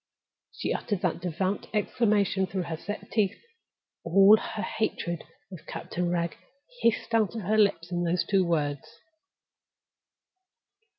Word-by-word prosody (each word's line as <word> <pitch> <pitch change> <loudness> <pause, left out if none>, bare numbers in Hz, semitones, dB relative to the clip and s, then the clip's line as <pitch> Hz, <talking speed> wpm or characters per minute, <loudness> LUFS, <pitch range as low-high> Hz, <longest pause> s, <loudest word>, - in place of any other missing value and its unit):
She - - -2
uttered 205 -5 -2
that 175 -1 -1
devout 185 +3 -2
exclamation 205 -3 +2
through 185 -1 -2
her 165 -1 -4
set 205 +6 -7
teeth. 210 -4 +1 0.6
All 195 +4 +7
her 220 0 -4
hatred 170 -6 -2 0.3
of 180 -4 -11
Captain 175 0 -3
Wragge 170 -1 -1 0.4
hissed 230 0 +1
out 225 -1 +2
of 225 - -3
her 215 +3 +1
lips 185 -4 +2
in 175 0 0
those 170 0 +1
two 195 -2 +3
words. 150 -5 -2
190 Hz, 130 wpm, -28 LUFS, 170-210 Hz, 0.6 s, All